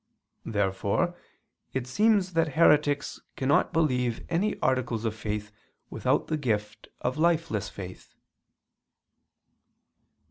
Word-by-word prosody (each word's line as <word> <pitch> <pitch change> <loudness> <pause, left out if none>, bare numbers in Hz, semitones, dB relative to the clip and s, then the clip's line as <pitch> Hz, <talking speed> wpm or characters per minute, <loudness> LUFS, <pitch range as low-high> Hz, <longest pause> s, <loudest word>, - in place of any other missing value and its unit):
Therefore 100 - 0 0.6
it 130 -2 -2
seems 195 - +2
that 165 -3 +1
heretics 150 -3 +3
cannot 135 +2 +2
believe 125 -8 0
any 180 +5 0
articles 125 -3 0
of 110 - 0
faith 105 -1 -4 0.4
without - - +1
the 155 - -1
gift 105 -6 -2
of 130 +4 -2
lifeless 160 - +1
faith. 90 -2 -10
130 Hz, 100 wpm, -27 LUFS, 105-165 Hz, 0.6 s, heretics